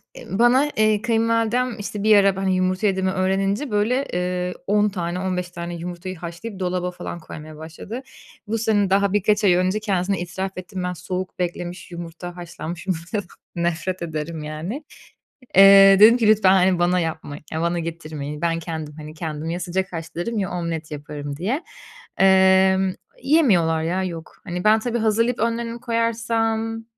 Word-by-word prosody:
eee, -, -, -10 dB
bana, 240 Hz, +7 st, +4 dB
eee, 215 Hz, -1 st, +3 dB
kayınvalidem 230 Hz, +1 st, +1 dB
işte 205 Hz, 0 st, -5 dB
bir 215 Hz, -1 st, +6 dB
ara 195 Hz, -1 st, +4 dB
ben, 195 Hz, -, -4 dB
hani, 190 Hz, -1 st, +1 dB
yumurta 185 Hz, +3 st, +1 dB
yediğimi 190 Hz, -1 st, +1 dB
öğrenince 195 Hz, +7 st, 0 dB
böyle, 235 Hz, +7 st, +1 dB
eee, 180 Hz, 0 st, -1 dB
10 210 Hz, +1 st, +3 dB
tane, 175 Hz, -2 st, -3 dB
15 180 Hz, -1 st, -2 dB
tane 170 Hz, 0 st, -6 dB
yumurtayı 175 Hz, +1 st, -6 dB
haşlayıp 180 Hz, +5 st, -7 dB
dolaba 180 Hz, 0 st, -1 dB
falan 175 Hz, -1 st, -7 dB
koymaya 155 Hz, -1 st, -10 dB
başladı. 165 Hz, +10 st, -8 dB, 0.5 s
Bu 225 Hz, +2 st, -1 dB
sene 210 Hz, -3 st, +1 dB
daha 200 Hz, +1 st, +2 dB
birkaç 210 Hz, +1 st, +2 dB
ay 190 Hz, -3 st, +5 dB
önce 185 Hz, +4 st, +1 dB
kendisine 195 Hz, -3 st, -1 dB
itiraf 190 Hz, +2 st, -5 dB
ettim 185 Hz, 0 st, -6 dB
ben 180 Hz, 0 st, -2 dB
soğuk 180 Hz, +1 st, -5 dB
beklemiş 175 Hz, 0 st, -4 dB
yumurta 175 Hz, +1 st, -8 dB
haşlanmış 175 Hz, 0 st, -7 dB
yumurtadan 185 Hz, +3 st, -2 dB, 0.3 s
nefret 175 Hz, +1 st, -2 dB
ederim, 160 Hz, -1 st, -4 dB
yani. 160 Hz, -, -5 dB, 0.7 s
Eee, 195 Hz, 0 st, +9 dB
dedim 225 Hz, +3 st, +8 dB
ki 230 Hz, -3 st, +2 dB
lütfen, 210 Hz, -3 st, +5 dB
hani, 185 Hz, -1 st, +3 dB
bana 180 Hz, +1 st, +2 dB
yapmayın, 160 Hz, -3 st, -4 dB
ya 160 Hz, -, -2 dB
bana 170 Hz, 0 st, 0 dB
getirmeyin. 155 Hz, -3 st, -6 dB
Ben 165 Hz, -1 st, 0 dB
kendim, 160 Hz, -2 st, -6 dB
hani, 155 Hz, 0 st, -9 dB
kendim 155 Hz, -1 st, -5 dB
ya 170 Hz, +1 st, -2 dB
sıcak 185 Hz, +2 st, -2 dB
haşlarım 170 Hz, +7 st, -4 dB
ya 190 Hz, -3 st, -2 dB
omlet 165 Hz, -3 st, -4 dB
yaparım 145 Hz, -1 st, -6 dB
diye. 235 Hz, -, -2 dB, 0.5 s
Emm, 190 Hz, 0 st, +5 dB, 0.3 s
yemiyorlar 190 Hz, -, +3 dB
ya, 180 Hz, +3 st, -1 dB
yok. 165 Hz, -3 st, -6 dB
Hani, 180 Hz, -1 st, -4 dB
ben 215 Hz, +1 st, +5 dB
tabii 240 Hz, +1 st, -2 dB
hazırlayıp 230 Hz, +2 st, +1 dB
önlerini 230 Hz, +1 st, -1 dB
koyarsam 225 Hz, -1 st, -1 dB
185 Hz, 160 wpm, -22 LUFS, 170-210 Hz, 0.7 s, Eee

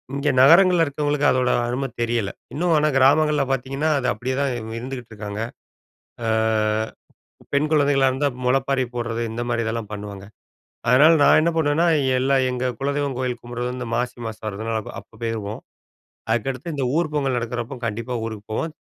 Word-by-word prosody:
இங்க 140 Hz, +1 st, 0 dB
நகரங்கள்ல 170 Hz, +4 st, +6 dB
இருக்கவங்களுக்கு 145 Hz, 0 st, 0 dB
அதோட 125 Hz, -1 st, +1 dB, 0.2 s
அரும 130 Hz, +3 st, -2 dB
தெரியல. 115 Hz, -3 st, 0 dB, 0.2 s
இன்னும் 170 Hz, +3 st, +1 dB
ஆனா 150 Hz, 0 st, +3 dB
கிராமங்கள்ல 145 Hz, +2 st, +4 dB
பார்த்தீங்கன்னா, 135 Hz, +4 st, -1 dB
அது 125 Hz, -, -2 dB
அப்படியே 125 Hz, +4 st, -3 dB
தான் 140 Hz, -2 st, +1 dB
இ -, -, -4 dB, 0.2 s
இருந்துகிட்டுருக்காங்க. 110 Hz, -5 st, -6 dB, 0.9 s
அ -, -, 0 dB, 1.2 s
பெண் 145 Hz, +2 st, +2 dB
குழந்தைங்களா 140 Hz, -3 st, +4 dB
இருந்தா 135 Hz, +3 st, 0 dB, 0.2 s
முளைப்பாரி 135 Hz, +1 st, +2 dB
போடுறது. 115 Hz, -1 st, -2 dB
இந்த 120 Hz, +1 st, -3 dB
மாதிரி 120 Hz, -1 st, 0 dB
இதெல்லாம் 110 Hz, -2 st, -3 dB
பண்ணுவாங்க. 100 Hz, -1 st, -7 dB, 0.7 s
அதனால 145 Hz, +6 st, +7 dB
நான் -, -, +6 dB
என்ன 170 Hz, +2 st, +2 dB
பண்ணுவேன்னா, 160 Hz, +2 st, +2 dB, 0.3 s
எல்லா 135 Hz, +2 st, +2 dB, 0.2 s
எங்க 125 Hz, 0 st, -2 dB
குலதெய்வம் 140 Hz, -1 st, -1 dB
கோயில் 125 Hz, -2 st, -2 dB
கும்பிடுறது 120 Hz, +1 st, -4 dB
இந்த 125 Hz, -2 st, -5 dB
மாசி 125 Hz, +1 st, -2 dB
மாசம் 110 Hz, 0 st, -8 dB
வருதுனா, 110 Hz, +2 st, -3 dB
அப் -, -, -9 dB
அப்ப 110 Hz, -, -21 dB
போயிருவோம். 110 Hz, -2 st, -3 dB, 0.7 s
அதுக்கடுத்து 135 Hz, +7 st, -2 dB
இந்த 135 Hz, -, -1 dB
ஊர் 155 Hz, -3 st, -1 dB
பொங்கல் 135 Hz, -4 st, 0 dB
நடக்குறப்போ 120 Hz, +1 st, -4 dB
கண்டிப்பா 115 Hz, +3 st, -3 dB
ஊருக்கு 110 Hz, -2 st, -7 dB
போவோம். 155 Hz, +8 st, -2 dB
130 Hz, 155 wpm, -22 LUFS, 115-145 Hz, 1.2 s, அதனால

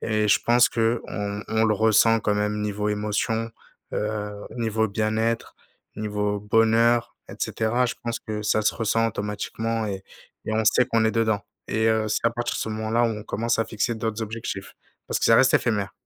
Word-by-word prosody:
Et 110 Hz, -1 st, 0 dB
je 105 Hz, -1 st, +4 dB
pense 120 Hz, +1 st, +5 dB
qu'on 110 Hz, -3 st, -2 dB
on 110 Hz, 0 st, +1 dB
le 110 Hz, -1 st, +3 dB
ressent 110 Hz, +1 st, +4 dB
quand 105 Hz, -1 st, 0 dB
même 105 Hz, 0 st, -1 dB
niveau 105 Hz, 0 st, -2 dB
émotion, 105 Hz, +2 st, -1 dB, 0.4 s
heu, 105 Hz, -1 st, -2 dB, 0.2 s
niveau 110 Hz, -1 st, 0 dB
bien-être, 110 Hz, +2 st, -1 dB, 0.4 s
niveau 105 Hz, -1 st, -2 dB
bonheur 115 Hz, +2 st, +3 dB, 0.2 s
et -, -, -8 dB
cetera. 120 Hz, +3 st, 0 dB
Je 120 Hz, -, -3 dB
pense 115 Hz, 0 st, -3 dB
que 105 Hz, -2 st, -5 dB
ça 110 Hz, +1 st, +1 dB
se -, -, +1 dB
ressent 115 Hz, 0 st, +1 dB
automatiquement 110 Hz, +1 st, -3 dB
et 95 Hz, -2 st, -4 dB, 0.4 s
et -, -, -3 dB
on 110 Hz, 0 st, +1 dB
sait 125 Hz, +3 st, +4 dB
qu'on 115 Hz, -2 st, +1 dB
est 110 Hz, -, +2 dB
dedans. 110 Hz, -3 st, +1 dB, 0.3 s
Et, 110 Hz, +1 st, +1 dB
heu, 110 Hz, -1 st, +2 dB
c'est 105 Hz, -, +1 dB
à 115 Hz, -, +3 dB
partir 120 Hz, +1 st, -3 dB
de -, -, -4 dB
ce -, -, -2 dB
moment-là, 110 Hz, +2 st, 0 dB
où -, -, +4 dB
on 105 Hz, -2 st, -3 dB
commence 115 Hz, +2 st, -1 dB
à -, -, +1 dB
fixer 115 Hz, +2 st, -1 dB
d'autres 110 Hz, 0 st, -3 dB
objectifs, 110 Hz, -3 st, -6 dB, 0.3 s
parce -, -, -2 dB
que -, -, +1 dB
ça 115 Hz, -, +6 dB
reste 130 Hz, 0 st, +5 dB
éphémère. 105 Hz, -5 st, +1 dB
110 Hz, 195 wpm, -24 LUFS, 105-115 Hz, 0.4 s, ça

